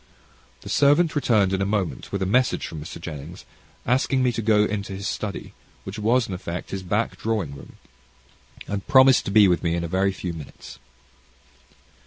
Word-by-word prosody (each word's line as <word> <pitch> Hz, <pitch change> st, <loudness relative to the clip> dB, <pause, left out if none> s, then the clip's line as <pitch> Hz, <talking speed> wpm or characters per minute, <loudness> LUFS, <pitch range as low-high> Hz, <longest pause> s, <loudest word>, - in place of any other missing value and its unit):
The -, -, -10 dB
servant 145 Hz, +4 st, +3 dB
returned 110 Hz, -8 st, +2 dB
in 95 Hz, -, 0 dB
a -, -, +1 dB
moment, 100 Hz, -3 st, -2 dB
with 100 Hz, -1 st, -1 dB
a -, -, 0 dB
message 125 Hz, +6 st, +1 dB
from 80 Hz, -2 st, -7 dB
Mr. 80 Hz, -, -9 dB
Jennings, 80 Hz, +2 st, -8 dB, 0.4 s
asking 130 Hz, +2 st, +1 dB
me 125 Hz, -, +3 dB
to 115 Hz, -, -3 dB
go 105 Hz, -1 st, +3 dB
into 100 Hz, -2 st, -3 dB
his 95 Hz, +1 st, -5 dB
study, 105 Hz, -2 st, -5 dB, 0.3 s
which 95 Hz, +3 st, -7 dB
was 115 Hz, +3 st, +2 dB
in 95 Hz, -, -5 dB
effect 90 Hz, -1 st, -6 dB
his 95 Hz, -, -4 dB
back 105 Hz, +5 st, -1 dB
drawing 105 Hz, -10 st, -2 dB
room, 70 Hz, -, -13 dB, 1.1 s
promising 130 Hz, -2 st, +6 dB
to -, -, -2 dB
be 105 Hz, 0 st, +6 dB
with 90 Hz, -1 st, +2 dB
me 85 Hz, -1 st, 0 dB
in 85 Hz, -, -2 dB
a -, -, -2 dB
very 95 Hz, +3 st, +1 dB
few 90 Hz, -2 st, -5 dB
minutes. 80 Hz, -3 st, -11 dB
100 Hz, 185 wpm, -24 LUFS, 90-115 Hz, 1.1 s, promising